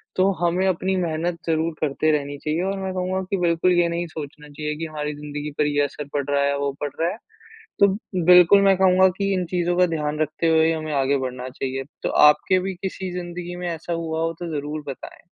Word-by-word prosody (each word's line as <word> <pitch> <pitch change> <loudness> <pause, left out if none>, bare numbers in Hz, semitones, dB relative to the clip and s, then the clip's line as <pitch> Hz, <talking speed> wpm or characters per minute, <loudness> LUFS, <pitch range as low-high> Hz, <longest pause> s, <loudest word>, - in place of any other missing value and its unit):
तो 190 +1 +3
हमें 180 +3 +1
अपनी 190 +1 0
मेहनत 170 0 -1
ज़रूर 160 +1 +1
करते 155 +1 +1
रहनी 145 -1 -2
चाहिए, 155 +4 -2
और 195 +1 -2
मैं 190 -1 -3
कहूँगा 185 +1 -1
कि 195 - 0
बिल्कुल 175 +1 +2
ये 175 -1 +3
नहीं 170 +1 -2
सोचना 150 -1 -9
चाहिए 150 +1 -4
कि 165 - -4
हमारी 150 -1 -4
ज़िंदगी 150 0 -6
पर 150 - +2
ये 145 0 +1
असर 145 +1 -5
पड़ 145 -1 0
रहा 140 0 +2
है, 140 0 +1
वो 140 0 -1
पड़ 145 - -1
रहा 165 +1 +2
है। - - -7 0.6
तो 200 - +7 0.4
बिल्कुल 180 +3 +7
मैं 195 -1 +5
कहूँगा 190 0 +5
कि 200 -1 0
इन 185 -1 0
चीज़ों 175 0 -1
का 180 - +5
ध्यान 150 -2 -2
रखते 155 +2 -1
हुए 160 0 +4
ही 165 - +3
हमें 155 -1 -3
आगे 140 0 +2
बढ़ना 130 -1 -4
चाहिए। 135 +1 -4 0.2
तो - - 0 0.2
आपके 185 +5 +3
भी 190 +1 -3
किसी 190 -1 -4
ज़िंदगी 175 0 -6
में 180 - -4
ऐसा 170 +1 -4
हुआ 160 -1 -3
हो 165 0 -1
तो 175 - -5
ज़रूर 150 +1 -5
बताएँ। 135 - -8
165 Hz, 225 wpm, -23 LUFS, 150-180 Hz, 0.6 s, तो